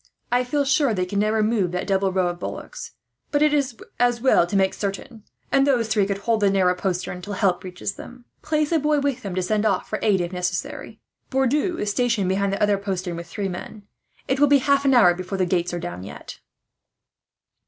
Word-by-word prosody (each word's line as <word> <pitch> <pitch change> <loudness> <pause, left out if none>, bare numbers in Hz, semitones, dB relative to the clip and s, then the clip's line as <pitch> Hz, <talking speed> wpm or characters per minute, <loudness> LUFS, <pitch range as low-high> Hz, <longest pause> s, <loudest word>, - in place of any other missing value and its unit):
I 245 +1 +3
feel 280 +3 0
sure 275 -4 +2
they 185 -1 0
can 200 +2 -2
never 215 +1 +2
move 210 -5 +1
that 180 - -2
double 195 -1 +1
row 185 -1 +1
of 175 0 -6
bullocks, - - -7 0.4
but 290 0 +2
it 300 -1 +3
is 275 -4 0 0.2
as 245 -1 +2
well 235 -8 +4
to 200 - -4
make 190 -1 +3
certain; 205 +3 -5 0.3
and 275 0 +3
those 245 -5 +2
three 205 -3 +2
could 200 -1 -1
hold 220 +2 0
the 205 -2 +3
narrow 190 -2 +3
postern, 180 -1 -3
till 205 +3 -6
help 190 -3 +1
reaches 185 +2 -5
them. 245 0 -12 0.2
Place 305 0 0
a 330 - +3
boy 300 0 +2
with 280 -3 -1
them 195 -6 -5
to 185 - 0
send 210 +3 0
off 195 -4 0
for 215 - -3
aid, 205 -3 +3
if 175 +1 -3
necessary. 180 0 -4 0.3
"Bourdou 280 +7 +1
is 210 0 -1
stationed 230 -4 +1
behind 195 +1 +1
the 200 - -1
other 205 -1 +2
postern, 185 -3 -3
with 170 0 -7
three 195 +3 -3
men. 190 +3 -7 0.4
It 265 - 0
will 290 - +6
be 285 0 +6
half 280 +1 +2
an 270 -1 +4
hour 180 -8 +6
before 185 +2 -5
the 185 - +2
gates 175 -1 0
are 175 - -3
down, 175 - -6
yet." 95 - -10
205 Hz, 225 wpm, -23 LUFS, 185-250 Hz, 0.4 s, will